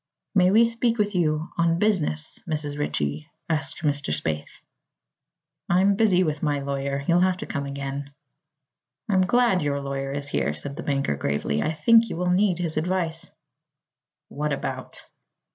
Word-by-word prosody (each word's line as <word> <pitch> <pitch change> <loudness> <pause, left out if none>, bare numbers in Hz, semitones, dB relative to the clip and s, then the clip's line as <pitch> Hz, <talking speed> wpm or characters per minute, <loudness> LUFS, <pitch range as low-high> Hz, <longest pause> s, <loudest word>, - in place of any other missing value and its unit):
"May 185 -3 +5
we 220 +4 +6
speak 230 0 +1
with 205 -1 0
you 160 -3 0
on 165 0 +3
business 170 -6 0
Mrs. 150 -2 -2
Ritchie?" 75 - -2 0.2
asked 160 0 -1
Mr. 145 - 0
Spaythe. 75 0 -3 1.1
"I'm 190 +3 +4
busy 195 -3 +3
with 155 -3 -2
my 145 -2 +1
lawyer. 140 0 -2
You'll 170 +1 +4
have 185 0 +2
to - - -6
come 140 0 -4
again." 140 0 -5 1.0
"I'm 190 -1 +4
glad 240 -4 +3
your 140 -1 0
lawyer 135 0 -4
is 140 0 -4
here," 75 - 0
said 140 - -6
the 170 - -6
banker 140 - 0
gravely. 70 +1 -1
"I 155 - 0
think 230 +9 +5
you - - -4
will 180 0 0
need 185 -1 +3
his 170 -3 -3
advice." 165 -1 -2 1.0
"What 150 +1 -3
about?" 140 - -5
155 Hz, 160 wpm, -25 LUFS, 140-185 Hz, 1.1 s, we